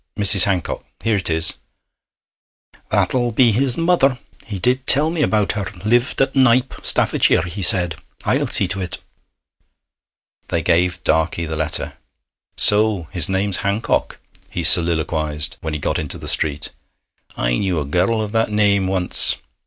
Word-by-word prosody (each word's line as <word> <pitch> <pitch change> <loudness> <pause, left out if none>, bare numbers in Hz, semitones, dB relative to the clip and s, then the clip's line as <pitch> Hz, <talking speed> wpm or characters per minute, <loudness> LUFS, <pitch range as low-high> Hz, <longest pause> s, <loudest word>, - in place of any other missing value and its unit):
Mrs. 100 -2 +3
Hancock 95 -3 -2 0.2
here 115 -1 +1
it 95 - -4
is.' 80 0 -2 1.3
'That'll 120 -2 +1
be 115 +1 +4
his 125 +3 0
mother; 165 -6 +2 0.3
he 105 -3 -5
did 125 +7 0
tell 150 +4 +4
me 165 -2 -2
about 105 -7 +1
her 100 -2 -4 0.2
lived 120 +3 +1
at 135 +1 -3
Knype, 130 -1 +3
Staffordshire, - - +2
he 90 +3 -6
said. 90 -3 +1 0.3
I'll - - +1
see - - +5
to 100 - -3
it.' 90 -2 -5 1.5
They - - -2
gave 90 0 +1
Darkey 80 +1 0
the 80 - -4
letter. 80 0 -3 0.6
'So 105 -5 +1
his 90 -3 +1
name's 95 0 +1
Hancock,' 100 +3 -1 0.3
he - - -4
soliloquized, 80 -3 +1
when 80 -1 -4
he - - -3
got - - -1
into 75 - -5
the - - -9
street. 75 -1 -1 0.7
'I - - 0
knew 95 -5 0
a 75 - -3
girl 95 +9 0
of 105 - -5
that 115 0 +1
name 100 -2 +2
once. 95 -1 +2
100 Hz, 155 wpm, -19 LUFS, 85-115 Hz, 1.5 s, see